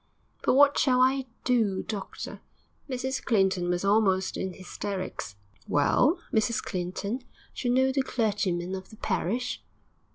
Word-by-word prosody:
'But -, -, +3 dB
what 285 Hz, +1 st, +6 dB
shall 255 Hz, -3 st, +3 dB
I 260 Hz, +1 st, +3 dB, 0.2 s
do, 220 Hz, -7 st, +2 dB
doctor?' 205 Hz, -3 st, -6 dB, 0.5 s
Mrs 260 Hz, +1 st, -2 dB
Clinton 190 Hz, -6 st, +2 dB
was 175 Hz, +2 st, 0 dB
almost 195 Hz, -2 st, +3 dB
in 190 Hz, -1 st, -3 dB
hysterics. 185 Hz, -, -5 dB, 0.3 s
'Well, 215 Hz, -, +3 dB, 0.2 s
Mrs 220 Hz, +1 st, +2 dB
Clinton, 200 Hz, +2 st, -3 dB, 0.3 s
d'you 245 Hz, -, -2 dB
know 260 Hz, +2 st, +4 dB
the 270 Hz, +1 st, +1 dB
clergyman 200 Hz, -8 st, -1 dB
of 190 Hz, 0 st, -6 dB
the 215 Hz, -, -14 dB
parish?' 245 Hz, +8 st, -1 dB
215 Hz, 130 wpm, -28 LUFS, 190-255 Hz, 0.5 s, what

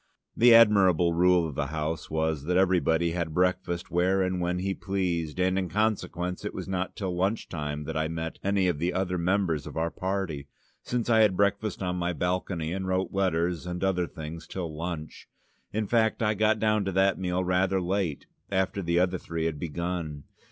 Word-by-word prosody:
The 120 Hz, 0 st, +7 dB
admirable 95 Hz, -7 st, +5 dB
rule 90 Hz, 0 st, +4 dB
of 75 Hz, -, -6 dB
the 70 Hz, +1 st, -2 dB
house 80 Hz, +1 st, -3 dB
was 80 Hz, -2 st, -1 dB
that 90 Hz, +2 st, +1 dB
everybody 85 Hz, -3 st, +2 dB
had 85 Hz, -2 st, -3 dB
breakfast 90 Hz, -1 st, 0 dB
where 95 Hz, +2 st, +2 dB
and 90 Hz, -1 st, -1 dB
when 90 Hz, 0 st, 0 dB
he 95 Hz, +2 st, -1 dB
pleased, 90 Hz, -5 st, -2 dB
and 95 Hz, +1 st, +2 dB
in 95 Hz, -2 st, -3 dB
consequence 90 Hz, -3 st, -1 dB
it -, -, -5 dB
was -, -, -5 dB
not 95 Hz, -1 st, -3 dB
till 95 Hz, -3 st, -3 dB
lunch 95 Hz, +5 st, 0 dB
time 75 Hz, -2 st, -4 dB
that 80 Hz, +1 st, -5 dB
I 80 Hz, 0 st, 0 dB
met 80 Hz, 0 st, -5 dB
any 100 Hz, -1 st, +2 dB
of 85 Hz, -5 st, 0 dB
the 85 Hz, +3 st, 0 dB
other 90 Hz, -1 st, -1 dB
members 85 Hz, -4 st, 0 dB
of -, -, -8 dB
our 80 Hz, +1 st, 0 dB
party, 95 Hz, -7 st, -3 dB, 0.3 s
since 120 Hz, -1 st, -2 dB
I 115 Hz, -2 st, +4 dB
had 105 Hz, -4 st, +4 dB
breakfast 100 Hz, +1 st, 0 dB
on 90 Hz, 0 st, -1 dB
my 90 Hz, 0 st, -1 dB
balcony, 90 Hz, -2 st, -2 dB
and 95 Hz, 0 st, -3 dB
wrote 95 Hz, 0 st, -1 dB
letters 90 Hz, -3 st, 0 dB
and 90 Hz, +1 st, -4 dB
other 90 Hz, -2 st, +1 dB
things 80 Hz, +1 st, -8 dB
till 85 Hz, -5 st, -5 dB
lunch. 80 Hz, -2 st, -6 dB, 0.4 s
In 110 Hz, +1 st, -1 dB
fact, 110 Hz, +1 st, +1 dB
I 105 Hz, 0 st, +2 dB
got 110 Hz, +1 st, +2 dB
down 110 Hz, -1 st, +2 dB
to 95 Hz, -, -1 dB
that 95 Hz, +1 st, +3 dB
meal 90 Hz, 0 st, -1 dB
rather 90 Hz, +1 st, +1 dB
late, 90 Hz, -4 st, -1 dB, 0.2 s
after 95 Hz, +1 st, 0 dB
the 85 Hz, -1 st, 0 dB
other 90 Hz, 0 st, +2 dB
three 80 Hz, -1 st, -3 dB
had 80 Hz, -3 st, -2 dB
begun. 85 Hz, -2 st, -4 dB
90 Hz, 195 wpm, -27 LUFS, 85-95 Hz, 0.4 s, The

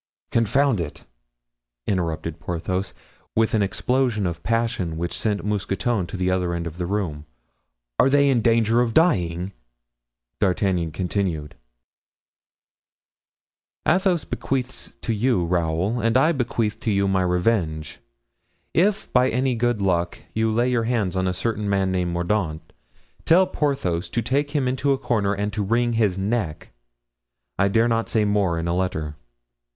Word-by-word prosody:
"Confound 115 Hz, -1 st, +2 dB
it," 75 Hz, -3 st, -7 dB, 0.8 s
interrupted 85 Hz, -3 st, -2 dB
Porthos, 90 Hz, +4 st, -3 dB, 0.4 s
with 110 Hz, 0 st, +2 dB
an 110 Hz, -, +3 dB
explosion 120 Hz, +2 st, 0 dB
of 85 Hz, -1 st, -3 dB
passion 115 Hz, -8 st, -1 dB
which 85 Hz, +1 st, -3 dB
sent 105 Hz, -2 st, -1 dB
Mousqueton 100 Hz, -1 st, -1 dB
to 95 Hz, -, -6 dB
the 90 Hz, 0 st, +1 dB
other 90 Hz, -2 st, 0 dB
end 85 Hz, 0 st, -3 dB
of 85 Hz, +1 st, -7 dB
the 90 Hz, -, -2 dB
room; 85 Hz, -7 st, -3 dB, 0.7 s
"are 130 Hz, -, +5 dB
they 140 Hz, +1 st, +4 dB
in 130 Hz, -4 st, +3 dB
danger 115 Hz, +1 st, +3 dB
of 115 Hz, -2 st, -1 dB
dying?" 90 Hz, -, +2 dB, 0.9 s
D'Artagnan 90 Hz, -4 st, +1 dB
continued: 85 Hz, -3 st, -2 dB, 2.3 s
"Athos 180 Hz, -1 st, +2 dB
bequeaths 130 Hz, -1 st, -3 dB
to 115 Hz, -, -1 dB
you 110 Hz, -4 st, +1 dB
Raoul, 85 Hz, +6 st, 0 dB
and 115 Hz, +1 st, +2 dB
I 155 Hz, +5 st, +4 dB
bequeath 115 Hz, -6 st, -1 dB
to -, -, -2 dB
you 100 Hz, -1 st, +2 dB
my 95 Hz, -1 st, +2 dB
revenge. 90 Hz, -4 st, 0 dB, 0.7 s
If 200 Hz, +4 st, +1 dB
by 125 Hz, +1 st, +4 dB
any 130 Hz, +1 st, +1 dB
good 120 Hz, -3 st, 0 dB
luck 85 Hz, -2 st, 0 dB, 0.2 s
you 110 Hz, 0 st, +1 dB
lay 120 Hz, +3 st, +2 dB
your 115 Hz, -2 st, +1 dB
hand 110 Hz, -6 st, 0 dB
on 95 Hz, 0 st, +1 dB
a -, -, +1 dB
certain 105 Hz, +1 st, -2 dB
man 95 Hz, -1 st, +1 dB
named 90 Hz, -2 st, 0 dB
Mordaunt, 85 Hz, -3 st, -2 dB, 0.5 s
tell 180 Hz, +3 st, +5 dB
Porthos 135 Hz, -, -1 dB
to 115 Hz, -, -1 dB
take 140 Hz, +5 st, 0 dB
him 145 Hz, -3 st, 0 dB
into 135 Hz, +2 st, +1 dB
a -, -, 0 dB
corner 105 Hz, -6 st, 0 dB
and 105 Hz, +1 st, -2 dB
to 110 Hz, -, -2 dB
wring 120 Hz, +3 st, +1 dB
his 105 Hz, -5 st, +1 dB
neck. 95 Hz, -5 st, -2 dB, 0.9 s
I 100 Hz, -, +4 dB
dare 115 Hz, +4 st, +3 dB
not 115 Hz, -1 st, 0 dB
say 110 Hz, -2 st, +2 dB
more 100 Hz, -5 st, +1 dB
in 85 Hz, +1 st, -2 dB
a 85 Hz, -, 0 dB
letter. 80 Hz, -5 st, -2 dB
100 Hz, 150 wpm, -23 LUFS, 90-120 Hz, 2.3 s, are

